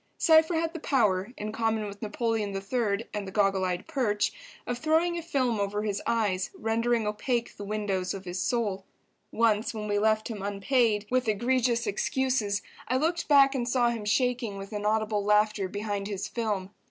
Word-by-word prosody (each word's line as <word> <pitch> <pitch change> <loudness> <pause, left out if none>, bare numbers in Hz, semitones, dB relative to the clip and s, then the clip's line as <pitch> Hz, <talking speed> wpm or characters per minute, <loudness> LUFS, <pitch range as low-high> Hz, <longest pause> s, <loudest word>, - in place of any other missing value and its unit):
Cypher 320 +1 +5
had 325 0 0
the 330 - -5
power, 215 -8 +1
in 210 +1 -4
common 225 -1 0
with 200 0 -8
Napoleon 215 -2 -1
III. 205 +1 -1
and 205 -2 -3
the - - -6
goggle 195 -1 +2
eyed 180 0 -2
perch, 245 -10 0 0.3
of 245 0 -3
throwing 325 +3 +2
a 340 - -3
film 255 -9 0
over 205 +1 -1
his 205 -2 -2
eyes, 205 -5 0
rendering 230 0 +1
opaque 230 +3 -2
the 205 - -8
windows 200 -3 -2
of 195 -1 -8
his 180 +1 -3
soul. 205 -5 -1 0.5
Once 225 0 +1
when 210 -1 -4
we 205 0 +1
left 215 0 +2
him 215 -4 -6
unpaid, 210 +2 +1
with 255 -1 +1
egregious 235 +2 +1
excuses, 215 0 0 0.2
I 255 - +1
looked 335 +4 0
back 280 -2 +6
and 245 -2 -1
saw 245 -1 +3
him 225 -3 -5
shaking 240 -1 0
with 195 +2 -8
inaudible 210 0 0
laughter 210 -1 +2
behind 205 0 -3
his 200 -2 -3
film. 205 -5 -2
215 Hz, 175 wpm, -28 LUFS, 205-245 Hz, 0.5 s, back